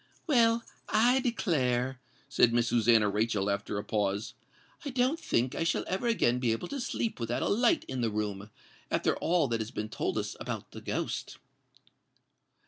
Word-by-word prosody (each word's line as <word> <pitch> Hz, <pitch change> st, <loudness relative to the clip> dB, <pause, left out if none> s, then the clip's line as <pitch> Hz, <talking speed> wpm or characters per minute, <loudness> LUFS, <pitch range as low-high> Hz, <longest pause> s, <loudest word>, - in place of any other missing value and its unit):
"Well, 235 Hz, -6 st, +3 dB, 0.3 s
I 240 Hz, +5 st, +4 dB
declare," 130 Hz, -, 0 dB, 0.3 s
said 115 Hz, -, +3 dB
Miss 120 Hz, 0 st, +2 dB
Susannah 115 Hz, -2 st, +4 dB
Rachel, 105 Hz, -1 st, 0 dB
after 100 Hz, +1 st, -3 dB
a 100 Hz, -, -3 dB
pause, 105 Hz, 0 st, -1 dB, 0.5 s
"I 290 Hz, -, -4 dB
don't 260 Hz, +5 st, +1 dB
think 125 Hz, +2 st, 0 dB
I -, -, -1 dB
shall 165 Hz, -, 0 dB
ever 190 Hz, +6 st, -2 dB
again 125 Hz, -, +2 dB
be 120 Hz, -2 st, +1 dB
able 115 Hz, -, -5 dB
to 280 Hz, -2 st, -4 dB
sleep 230 Hz, -, -2 dB
without 120 Hz, +1 st, -1 dB
a -, -, 0 dB
light 245 Hz, +10 st, +3 dB
in 130 Hz, -2 st, -3 dB
the 115 Hz, -, +1 dB
room, 105 Hz, -1 st, -3 dB, 0.4 s
after -, -, +1 dB
all 170 Hz, -3 st, +2 dB
that 115 Hz, -1 st, 0 dB
has 110 Hz, -, -4 dB
been 110 Hz, -3 st, -5 dB
told -, -, -2 dB
us -, -, -3 dB
about -, -, -5 dB
the -, -, -9 dB
ghost." -, -, -3 dB
125 Hz, 175 wpm, -30 LUFS, -, 0.5 s, I